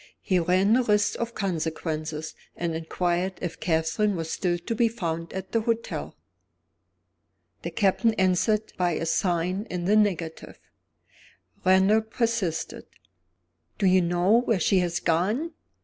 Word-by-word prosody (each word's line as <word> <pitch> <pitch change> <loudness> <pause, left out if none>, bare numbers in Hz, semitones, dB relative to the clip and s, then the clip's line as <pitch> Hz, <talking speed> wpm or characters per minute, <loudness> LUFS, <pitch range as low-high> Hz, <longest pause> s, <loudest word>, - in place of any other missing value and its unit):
He 185 -2 +2
ran 185 +5 +3
the 255 - +4
risk 210 -3 +1
of 235 0 -3
consequences, 160 -4 -3 0.2
and 170 -1 -2
inquired 175 +3 -1
if 175 - -5
Catherine 165 +5 +1
was 165 -1 -4
still 175 -2 0
to 175 +6 -4
be 230 +1 +3
found 170 -7 -4
at 190 0 -6
the 230 - +1
hotel. 230 +1 -3 1.5
The - - -4
Captain 220 +3 +2
answered 190 +3 +1
by 175 -1 +1
a 165 - -2
sign 180 +4 0
in 175 -1 -3
the 205 +3 +3
negative. 180 -6 0 1.1
Randal 190 +4 +4
persisted. 220 -6 -2 0.9
"Do - - 0
you 185 0 +5
know 175 +6 +3
where 230 -5 0
she 185 +3 +3
has 175 -1 -1
gone?" 210 - 0
185 Hz, 135 wpm, -26 LUFS, 170-215 Hz, 1.5 s, you